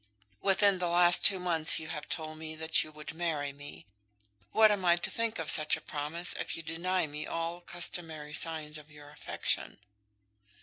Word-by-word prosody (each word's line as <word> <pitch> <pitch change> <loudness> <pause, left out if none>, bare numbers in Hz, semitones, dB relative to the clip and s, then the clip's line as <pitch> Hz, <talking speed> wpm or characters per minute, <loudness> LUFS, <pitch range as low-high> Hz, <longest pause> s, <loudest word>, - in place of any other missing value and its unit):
Within 195 0 +2
the 180 - -1
last 175 0 +5
two 195 -2 +5
months 165 -3 +4
you 160 0 -6
have 150 -3 -7
told 155 -1 -3
me 160 0 -7
that 160 0 +1
you 155 - -12
would 150 +1 -10
marry 155 -4 -3
me. 135 - -12 0.7
What 220 -1 +5
am 200 -2 -2
I 170 -1 +4
to 175 - -4
think 230 -1 -3
of - - +2
such 155 -1 +4
a - - -11
promise 155 +4 -1
if - - -4
you 165 - -8
deny 170 +3 -2
me 150 0 -6
all 165 +1 -4
customary 165 -4 -3
signs 155 -1 0
of 150 0 -17
your 145 -1 -15
affection?" 150 - -3
160 Hz, 185 wpm, -29 LUFS, 150-175 Hz, 0.7 s, last